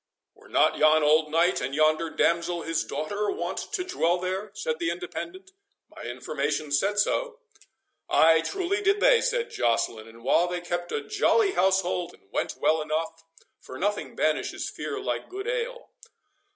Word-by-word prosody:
"Were - - -20
not - - +3
yon 155 0 +5
old 155 +1 +4
knight, 165 +3 +2
and 130 +2 -3
yonder 155 +2 +2
damsel 170 +1 0
his 165 -1 -1
daughter, 200 +9 -3
wont 395 - -3
to 400 -4 -1
dwell 180 - +1
there?" 185 +3 -3
said 475 0 -3
the 335 - 0
Independent. 370 +1 -6 0.4
"My - - -10
information 150 -2 -3
said 195 +9 +1
so." 470 - 0 0.7
"Ay, 160 0 +5
truly 385 - -2
did 400 0 +2
they," - - +5
said 485 -2 -1
Joceline; 115 -2 0
"and 115 +1 -15
while 170 +7 +3
they 175 0 -3
kept 175 0 -4
a - - -1
jolly 425 -1 +3
house 190 - +3
hold, 175 -1 -3
all - - -29
went - - -2
well 160 0 +2
enough; 160 +2 -3 0.4
for 130 - -10
nothing 205 +5 -2
banishes - - -1
fear 420 - -5
like 405 - -3
good 395 +3 -6
ale. - - -3
180 Hz, 165 wpm, -26 LUFS, -, 0.7 s, yon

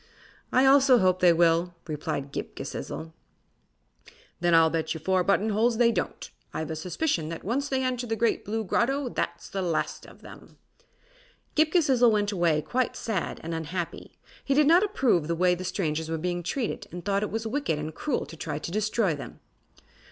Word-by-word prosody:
"I 255 +1 +4
also 270 -1 +6
hope 185 -3 +2
they 180 -1 +6
will," 170 +1 +2
replied 145 -3 -4
Ghip - - -5
Ghisizzle. 160 0 -6 1.3
"Then 175 -1 +3
I'll 160 -1 +5
bet 160 0 -1
you - - -5
four 185 +3 +1
button 200 +3 +2
holes 225 +2 +2
they 235 0 +4
don't. - - -3 0.3
I've 160 0 -3
a - - -3
suspicion 170 - -2
that 165 - -6
once 270 +8 -1
they 265 -1 0
enter 250 -1 -2
the 225 - -1
Great 230 +1 +1
Blue 220 +2 -2
Grotto 260 +6 0
that's - - -3
the 195 - -4
last 170 -3 -2
of - - -16
them." - - -14 1.0
Ghip 310 0 +3
Ghisizzle 265 -9 +4
went 205 -1 +1
away 170 -5 +1
quite 255 0 -1
sad 215 -6 -3
and 165 +1 -4
unhappy. 165 +2 -5 0.3
He 275 - 0
did 300 +1 +5
not 335 +5 +6
approve 255 - +1
the 170 - 0
way 180 +1 +3
the 180 +1 -4
strangers 160 -4 -2
were 165 - -1
being 175 +2 -2
treated 225 +7 -3
and 175 +1 -8
thought 200 -1 +1
it 210 - -2
was 225 +1 -3
wicked 265 - -1
and 155 +1 -5
cruel 280 - -2
to 165 - -11
try 155 -2 -4
to 160 - -6
destroy 215 -2 +1
them. 140 - -9
190 Hz, 190 wpm, -27 LUFS, 165-240 Hz, 1.3 s, also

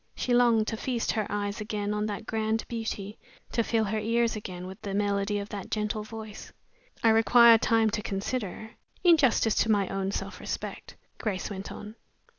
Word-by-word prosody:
She 250 - -1
longed 235 -3 +4
to 225 - -3
feast 240 0 -1
her 215 -2 -1
eyes 205 +1 -2
again 210 -1 -2
on 210 0 -1
that 210 +1 -5
grand 220 0 -1
beauty, 220 -3 -5 0.3
to 230 - +1
fill 225 0 +1
her 215 +1 -1
ears 230 +1 +1
again 180 -4 -6
with 190 +1 -9
the 195 -1 -4
melody 200 0 0
of 200 0 -5
that 200 -3 -6
gentle 215 0 -1
voice. 220 -1 -9 0.5
"I 225 - +6
require 230 +1 +7
time 225 -1 +3
to 210 - -2
consider 210 +1 -4 0.3
in 345 -2 +7
justice 240 -6 +3
to 225 - +2
my 200 -3 +3
own 195 0 -2
self 200 - -4
respect," - - -6 0.2
Grace 210 -3 -3
went 195 0 -6
on. 210 +2 -9
215 Hz, 185 wpm, -28 LUFS, 205-225 Hz, 0.5 s, require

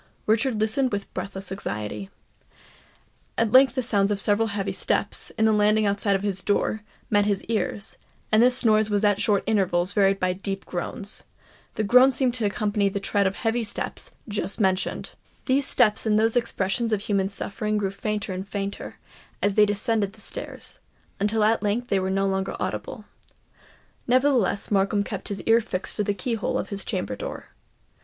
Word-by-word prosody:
Richard 225 +1 +1
listened 235 +5 +1
with 200 -1 -4
breathless 190 0 -6
anxiety. 105 - -4 1.3
At 230 -2 +1
length 260 0 +6
the 255 - 0
sounds 205 -4 +2
of 205 -1 0
several 210 +2 +2
heavy 200 -2 -2
steps, - - 0
in 220 - +3
the 220 - +4
landing 210 +1 +3
outside 200 -1 +1
his 195 -2 -1
door, 210 +2 0 0.3
met 205 -1 +4
his 200 -2 0
ears; 210 -1 -2 0.3
and 215 +1 +5
this 250 +1 +3
noise 215 -1 +4
was 205 0 0
at 205 -1 +3
short 205 -2 +2
intervals 190 -4 +1
varied 195 -1 +3
by 185 0 +1
deep 195 +1 -5
groans. 195 +4 -4 0.5
The 215 - -1
groans 250 +5 +6
seemed 255 -1 +1
to 235 -3 -1
accompany 205 -1 +1
the 200 - -3
tread 200 0 +1
of 190 - -1
the - - -8
heavy 230 +1 0
steps 210 - -4 0.2
just 205 0 -3
mentioned. 190 -2 0 0.3
These 270 +1 +2
steps 220 -2 +3
and 210 -1 +3
those 225 +1 +2
expressions 230 -1 0
of 210 -2 +1
human 200 -2 0
suffering 210 +1 -3
grew 195 -2 -1
fainter 210 0 -3
and 190 +2 -5
fainter, 200 0 -5 0.4
as 205 - +1
they 210 +1 +5
descended 205 -1 0
the 220 - -15
stairs, - - -5 0.4
until 210 +2 +1
at 220 +2 +3
length 225 +4 -1
they 195 - +2
were 190 0 -1
no 195 +1 +1
longer 190 0 -1
audible. - - -4 1.0
Nevertheless 250 -6 +2
Markham 200 +1 +2
kept 200 -2 -6
his 200 -1 -4
ear 225 +1 +4
fixed 195 -4 -4
to 210 - +1
the 205 0 -1
key 230 +6 -3
hole 225 - -1
of - - -4
his 200 -1 -3
chamber 180 - -3
door. - - -7
205 Hz, 180 wpm, -25 LUFS, 195-225 Hz, 1.3 s, length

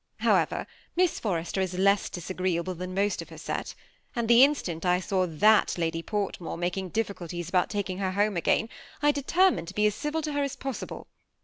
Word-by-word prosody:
However, - - +2 0.3
Miss 360 -1 +2
Forrester 180 -2 -1
is 185 -1 -2
less 200 +1 +3
disagreeable 185 -1 -2
than 180 +1 -6
most 200 +1 +1
of - - -10
her - - -11
set; - - -4 0.4
and 235 -2 -1
the 235 +1 +7
in 290 +2 +5
stant 170 - -5
I 180 -1 +3
saw 185 0 0
that 210 +8 +4
Lady 165 -1 -1
Portmore 195 -4 -3
making 180 +2 -2
difficulties 175 -5 -3
about 180 -1 +2
taking 195 -3 -3
her 190 -1 -1
home 205 +1 +1
again, 175 +5 +2 0.4
I 295 - +6
determined 290 - +2
to 185 - -8
be 210 - +2
as 210 - +3
civil 300 +6 -3
to 300 -1 -3
her 285 - 0
as 280 -2 -2
possible. 270 -2 -6
195 Hz, 195 wpm, -27 LUFS, 180-225 Hz, 0.4 s, the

